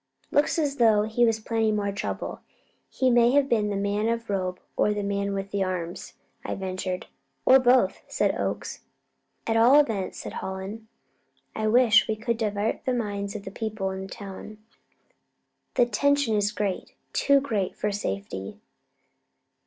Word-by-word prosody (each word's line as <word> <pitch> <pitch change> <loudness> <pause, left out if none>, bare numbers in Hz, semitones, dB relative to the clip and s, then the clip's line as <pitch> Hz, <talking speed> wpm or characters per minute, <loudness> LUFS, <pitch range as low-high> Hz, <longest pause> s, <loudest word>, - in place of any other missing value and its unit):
"Looks 290 +3 +2
as 290 -3 0
though 220 -4 +5
he 225 +2 +2
was 225 -1 +1
planning 220 -1 0
more 200 -1 -1
trouble. 200 +2 -4 0.5
He 260 -1 +1
may 240 +1 +5
have 285 -1 +4
been 215 -5 +1
the 205 - -2
man 200 +2 0
of 230 0 -1
the 205 - -3
robe, 185 -1 -2 0.2
or 210 - +2
the 205 - -2
man 200 0 -1
with 195 0 -4
the 200 -1 0
arms," 180 -2 -4 0.3
I - - -3
ventured. 185 -1 -4 0.4
"Or 265 +1 +8
both," 245 -6 +3
said - - +1
Oakes. - - -3 0.7
"At 225 0 +1
all 245 +6 +7
events," 220 -10 0
said - - -7
Hallen, 195 +4 -6 0.7
"I 215 0 -1
wish 225 -2 +6
that - - 0
we - - 0
could 230 +1 -2
divert 210 -1 -1
the 255 - 0
minds 205 -3 -3
of 205 - -6
the 195 - -6
people 215 -3 -3
in 190 0 -5
town; 200 +1 -9 1.2
the 245 - +5
tension 285 -2 +2
is 205 0 +1
great 205 -3 -3 0.2
too 280 0 +4
great 215 -9 -2
for 210 - -1
safety." 100 - -4
210 Hz, 170 wpm, -26 LUFS, 195-235 Hz, 1.2 s, Or